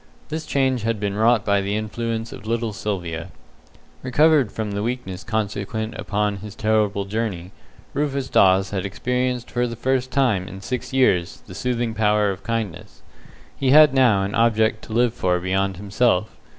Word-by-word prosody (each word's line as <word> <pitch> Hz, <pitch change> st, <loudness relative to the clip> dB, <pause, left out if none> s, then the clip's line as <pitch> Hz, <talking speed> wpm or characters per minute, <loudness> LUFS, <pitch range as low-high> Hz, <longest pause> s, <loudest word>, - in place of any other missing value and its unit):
This 155 Hz, +1 st, -4 dB
change 130 Hz, -3 st, +1 dB
had 115 Hz, 0 st, -1 dB
been 100 Hz, -1 st, -2 dB
wrought 110 Hz, +1 st, +3 dB
by 100 Hz, -1 st, +2 dB
the 100 Hz, +1 st, -2 dB
influence 115 Hz, +1 st, -3 dB
of 110 Hz, -, -10 dB
little 115 Hz, -1 st, -1 dB
Sylvia. 85 Hz, -5 st, -4 dB, 0.7 s
Recovered 145 Hz, -2 st, +3 dB
from 110 Hz, -2 st, -4 dB
the 100 Hz, 0 st, -2 dB
weakness 110 Hz, -5 st, -4 dB
consequent 110 Hz, +1 st, -3 dB
upon 105 Hz, -1 st, -2 dB
this 105 Hz, 0 st, -9 dB
terrible 105 Hz, -2 st, +1 dB
journey, 100 Hz, -4 st, -3 dB, 0.4 s
Rufus 140 Hz, -2 st, -1 dB
Dawes 95 Hz, -4 st, +4 dB
had 95 Hz, -2 st, -2 dB
experienced 125 Hz, +4 st, -2 dB
for 125 Hz, 0 st, 0 dB
the 115 Hz, -, -5 dB
first 130 Hz, +2 st, 0 dB
time 120 Hz, -10 st, +1 dB
in 95 Hz, +1 st, -9 dB
six 125 Hz, +5 st, -4 dB
years 95 Hz, -10 st, +1 dB
the 95 Hz, -, -11 dB
soothing 120 Hz, +2 st, -2 dB
power 105 Hz, -2 st, +2 dB
of 95 Hz, -, -7 dB
kindness. 115 Hz, -7 st, -5 dB, 0.5 s
He 135 Hz, -, 0 dB
had 150 Hz, 0 st, +7 dB
now 120 Hz, -7 st, +4 dB
an 100 Hz, +1 st, -3 dB
object 110 Hz, -1 st, +2 dB
to 110 Hz, -, -8 dB
live 120 Hz, 0 st, +2 dB
for 90 Hz, -6 st, 0 dB
beyond 95 Hz, +1 st, -1 dB
himself. 105 Hz, +1 st, 0 dB
110 Hz, 165 wpm, -22 LUFS, 100-125 Hz, 0.7 s, had